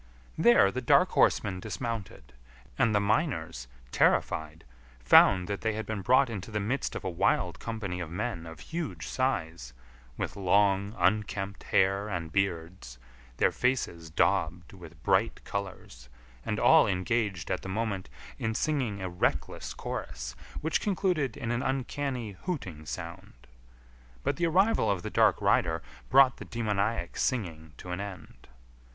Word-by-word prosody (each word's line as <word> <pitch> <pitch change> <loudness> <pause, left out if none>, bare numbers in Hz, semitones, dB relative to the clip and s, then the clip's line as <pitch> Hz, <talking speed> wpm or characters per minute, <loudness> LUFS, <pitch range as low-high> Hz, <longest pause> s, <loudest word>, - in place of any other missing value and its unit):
There 120 -4 +5
the 130 - -3
dark 120 - +4
horseman 95 -3 +2
dismounted, 105 - -5 0.4
and 110 - +2
the - - +5
miners, 105 - -1 0.2
terrified, 80 +1 +1 0.4
found 90 +9 +6
that 100 -1 -3
they 110 -1 0
had 110 0 -4
been 105 -1 -4
brought 130 +6 +4
into 110 -3 -6
the 105 -1 -2
midst 115 +7 -2
of - - -5
a - - -3
wild 85 - +1
company 105 -6 -4
of 85 -3 -5
men 90 -2 -4
of 80 -2 -10
huge 165 -2 -5
size, 80 - -2 0.4
with - - -3
long, 100 +2 +2
unkempt 100 +1 0
hair 95 +2 +2
and 85 -4 -4
beards, 85 -9 -2 0.4
their - - +3
faces 100 -10 -1
daubed 90 +1 0
with 90 -4 -13
bright - - +2
colours, 90 -11 -6 0.3
and - - -2
all - - +6
engaged 95 -1 -1
at - - -1
the 95 - -7
moment 100 -2 -2 0.3
in 110 0 -1
singing 125 -11 -1
a - - -2
reckless 90 0 -2
chorus - - -5 0.3
which 160 +1 0
concluded 180 - 0
in 115 - -3
an 120 +1 0
uncanny 130 -3 -2
hooting 90 - -4
sound. - - -8 0.8
But - - 0
the 170 - +1
arrival 195 +7 +3
of 95 -3 0
the - - -5
dark - - +4
rider 80 -1 +2 0.3
brought 130 0 +6
the - - -9
demoniac 105 -4 -2
singing 80 - -2
to 90 - -8
an 90 - -3
end. 95 -11 -9
100 Hz, 145 wpm, -29 LUFS, 85-120 Hz, 0.8 s, found